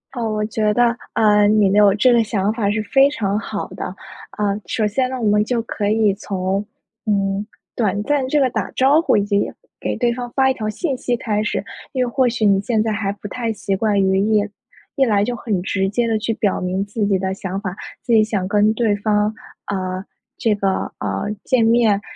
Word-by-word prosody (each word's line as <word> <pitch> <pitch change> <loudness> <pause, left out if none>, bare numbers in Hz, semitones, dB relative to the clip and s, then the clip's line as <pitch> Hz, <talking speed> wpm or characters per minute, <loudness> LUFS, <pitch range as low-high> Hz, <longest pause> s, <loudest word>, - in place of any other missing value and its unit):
哦， 230 -3 -2
我 210 0 -1
觉 215 -1 0
得， 240 -1 +3 0.2
呃， 210 -1 +4
你 210 -1 +4
能 200 - +2
有 200 - +5
这 245 +4 +4
个 235 -1 +4
想 205 -2 0
法 210 -3 0
是 215 +1 -1
非 270 +6 +4
常 210 -7 -1
好 225 - -4
的。 - - -6 0.5
呃， 205 0 0
首 215 -2 0
先 255 +5 0
呢， 260 -1 -4
我 220 - +1
们 210 0 +3
就 235 +1 -1
可 205 -2 -2
以 215 -2 +3
从， 195 0 -2 0.4
嗯， 200 -1 0 0.3
短 205 -3 0
暂 285 +2 +1
这 295 - +2
个 265 -2 +3
打 220 -4 -3
招 275 +5 +4
呼， 335 - +2
以 205 - +2
及 205 -1 0 0.3
给 - - -2
对 240 -1 +1
方 245 0 -6
发 265 0 +3
一 - - +2
条 215 -4 -3
信 270 +3 -2
息 245 - -1
开 215 -3 -1
始。 210 - -2 0.3
因 255 -2 0
为 - - -3
或 260 +1 +2
许 230 -2 -1
你 195 -1 +4
现 220 0 0
在 220 - 0
还 200 -2 -1
不 205 0 -8
太 230 +1 -3
习 200 -2 -2
惯 205 0 +1
于 190 0 +2 0.2
一 205 - 0 0.5
一 270 - +3
来 205 -3 +2
就 245 +1 -2
很 205 -6 -2
直 195 0 -1
接 230 +3 0
地 225 - +1
去 225 +1 -1
表 200 -3 0
明 185 +2 -1
自 205 +1 -2
己 195 -2 +1
的 190 0 -2
想 190 0 -4
法， 190 -3 -5 0.3
自 245 -2 -1
己 220 -1 +6
想 205 -4 -2
跟 210 +1 +3
对 220 -3 +1
方 210 +1 +1 0.3
呃， 185 -1 -3 0.3
这 220 -2 +1
个， 195 -1 -1
呃， 100 -2 -2 0.2
见 250 -3 +2
面， 225 -3 +3
210 Hz, 240 characters per minute, -20 LUFS, 200-235 Hz, 0.5 s, 己